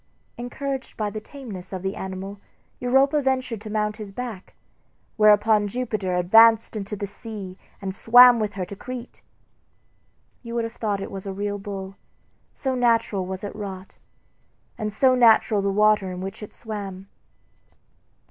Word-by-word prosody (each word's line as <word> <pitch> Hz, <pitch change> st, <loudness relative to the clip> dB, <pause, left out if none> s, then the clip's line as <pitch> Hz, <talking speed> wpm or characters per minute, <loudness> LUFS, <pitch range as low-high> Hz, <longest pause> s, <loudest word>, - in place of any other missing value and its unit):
Encouraged 265 Hz, +2 st, -5 dB
by 210 Hz, -2 st, -2 dB
the 215 Hz, -, -6 dB
tameness 220 Hz, -7 st, -9 dB
of 190 Hz, -1 st, -5 dB
the 195 Hz, +1 st, -2 dB
animal 190 Hz, +1 st, -6 dB, 0.4 s
Europa 270 Hz, +4 st, +3 dB
ventured 260 Hz, -5 st, -1 dB
to 215 Hz, -, -8 dB
mount 210 Hz, 0 st, -1 dB
his 210 Hz, -3 st, -8 dB
back, 220 Hz, -3 st, -7 dB, 0.6 s
whereupon 210 Hz, 0 st, +4 dB
Jupiter 210 Hz, -5 st, -2 dB
advanced 225 Hz, +6 st, +5 dB
into 210 Hz, 0 st, -4 dB
the 205 Hz, -, -4 dB
sea 200 Hz, -2 st, -8 dB, 0.2 s
and 190 Hz, -1 st, -4 dB
swam 245 Hz, +3 st, +7 dB
with 210 Hz, -2 st, -2 dB
her 190 Hz, -2 st, -3 dB
to 200 Hz, -, -9 dB
Crete. 250 Hz, +3 st, -8 dB, 1.2 s
You 235 Hz, -1 st, -7 dB
would 235 Hz, -, 0 dB
have 225 Hz, 0 st, -5 dB
thought 205 Hz, -4 st, -2 dB
it -, -, -6 dB
was 195 Hz, 0 st, -7 dB
a 195 Hz, -, -3 dB
real 205 Hz, +1 st, -3 dB
bull, 195 Hz, -1 st, -7 dB, 0.5 s
so 265 Hz, -2 st, -2 dB
naturally 230 Hz, -6 st, +1 dB
was 190 Hz, +1 st, -6 dB
it 205 Hz, -, -6 dB
wrought, 195 Hz, -2 st, -8 dB, 0.8 s
and 215 Hz, 0 st, -3 dB
so 255 Hz, +5 st, +3 dB
natural 225 Hz, -3 st, +5 dB
the 200 Hz, -, 0 dB
water 210 Hz, -1 st, +3 dB
in 180 Hz, -, -6 dB
which 195 Hz, +4 st, -6 dB
it 210 Hz, -, -8 dB
swam. 200 Hz, -4 st, -7 dB
210 Hz, 155 wpm, -24 LUFS, 195-235 Hz, 1.2 s, swam